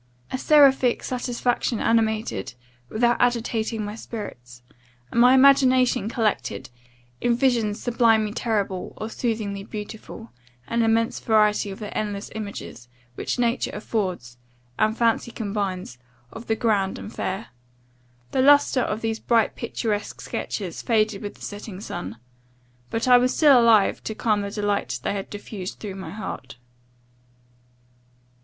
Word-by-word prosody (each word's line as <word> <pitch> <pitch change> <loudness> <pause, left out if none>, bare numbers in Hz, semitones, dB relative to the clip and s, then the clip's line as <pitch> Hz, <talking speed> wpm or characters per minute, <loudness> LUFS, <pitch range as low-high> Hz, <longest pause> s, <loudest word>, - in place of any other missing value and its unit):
A - - -1
seraphic 270 -5 +5
satisfaction 245 -1 -1
animated, 220 - 0 0.3
without 240 +2 +2
agitating 230 -2 0
my 205 - -5
spirits; 125 - -8 0.5
and 235 - +3
my 250 +2 +7
imagination 260 -4 +5
collected, 215 - -2 0.5
in 240 -1 +2
visions 235 -5 +1
sublimely 225 -3 +2
terrible, 200 -6 -2
or 220 +1 -5
soothingly 215 -5 -2
beautiful, 210 - -8 0.4
an 235 0 0
immense 225 0 +1
variety 210 -2 +2
of 195 - -7
the 210 -2 -7
endless 205 -2 -3
images, 200 - -7 0.3
which - - -3
nature 240 -1 +1
affords, 185 - -3 0.4
and 215 +1 +2
fancy 230 0 +1
combines, 200 - -4 0.3
of 225 - -9
the 220 - +1
grand 205 -5 0
and 210 - -8
fair. 195 +4 -4 0.8
The 260 - +2
lustre 285 -1 +5
of 215 -2 -2
these 225 0 -2
bright 230 -3 +2
picturesque 220 -3 -3
sketches 185 -6 -4
faded 215 -3 +1
with 205 - -6
the - - -14
setting 205 -2 -7
sun; 105 - -6 0.7
but 225 +2 -2
I 250 -1 +8
was 250 +1 +1
still 280 -6 +7
alive 225 -4 +4
to 220 - -4
the - - -27
calm 205 -3 0
delight 205 0 -1
they - - -1
had 195 -1 -5
diffused 205 -2 -7
through 205 -3 -6
my 190 -4 -7
heart. 150 -9 -7
220 Hz, 135 wpm, -24 LUFS, 200-235 Hz, 0.8 s, I